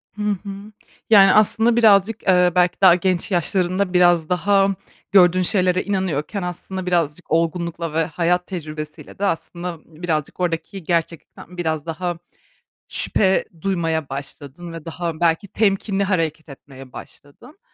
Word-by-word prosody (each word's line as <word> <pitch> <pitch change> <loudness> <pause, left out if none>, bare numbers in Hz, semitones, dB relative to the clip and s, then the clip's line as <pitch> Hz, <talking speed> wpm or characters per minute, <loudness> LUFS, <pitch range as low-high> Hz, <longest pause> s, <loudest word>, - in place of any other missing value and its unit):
Hı 210 - -7
hı. 200 +1 -7 0.4
Yani 195 -3 +7
aslında 225 +2 +3
birazcık, 215 -2 +4
eee, 180 -1 +4
belki 180 0 +2
daha 185 -3 +7
genç 185 +1 -1
yaşlarında 185 +2 0
biraz 175 -3 +3
daha, 195 +2 +2 0.4
gördüğün 185 -2 +5
şeylere 185 0 +1
inanıyorken 190 -1 -2
aslında 180 +1 -5
birazcık 170 -2 -1
olgunlukla 165 0 -1
ve 165 0 +1
hayat 180 +2 -1
tecrübesiyle 155 -4 -8
de 200 - 0
aslında 175 -1 -3
birazcık 160 -2 -4
oradaki 180 +2 -3
gerçeklikten 170 +1 -4
biraz 160 -3 -2
daha 175 +1 -4 0.7
şüphe 190 -2 +1 0.2
duymaya 165 -6 -1
başladın 145 +4 -8
ve 165 -1 -9
daha, 165 -1 -5
belki, 170 +4 +1
temkinli 200 -1 0
hareket 165 -5 -2
etmeye 135 -1 -13
başladın. 145 - -13
175 Hz, 130 wpm, -21 LUFS, 165-195 Hz, 0.7 s, Yani